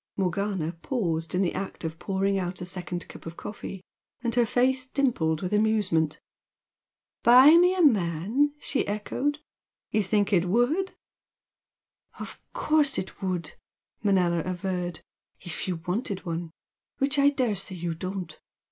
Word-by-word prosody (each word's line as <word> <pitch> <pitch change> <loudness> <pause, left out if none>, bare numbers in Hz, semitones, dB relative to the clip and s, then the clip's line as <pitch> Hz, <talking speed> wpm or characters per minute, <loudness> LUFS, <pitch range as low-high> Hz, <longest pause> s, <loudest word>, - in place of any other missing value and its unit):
Morgana 190 -3 -1
paused 170 - -1
in 185 - +2
the 175 - 0
act 195 -2 -5
of 160 0 -4
pouring 195 +1 0
out 180 -1 -3
a 180 - -5
second 180 -1 -4
cup - - -11
of 165 - -8
coffee, 195 -2 -7 0.4
and 235 -1 0
her 240 -1 +3
face 255 +3 +2
dimpled 230 - +1
with 180 - -2
amusement. 205 -8 +2 1.0
"Buy 255 +6 +8
me 360 +2 +5
a 365 - +2
man!" 215 - +2
she 275 - -1
echoed 235 +8 -1 0.5
"You 215 - +2
think 205 +1 +1
it 180 -2 +4
would?" 245 - +1 1.2
"Of - - -8
course 305 -2 +2
it 190 - -5
would!" 180 -4 -2 0.5
Manella 185 -5 +2
averred 180 -2 -3 0.4
"If 175 0 -4
you 185 - 0
wanted 195 +1 -2
one, 170 0 -3 0.5
which 280 +1 +1
I 280 0 +6
daresay 215 -9 -1
you 170 -1 -3
don't. 180 -1 -6
195 Hz, 140 wpm, -27 LUFS, 175-245 Hz, 1.2 s, Buy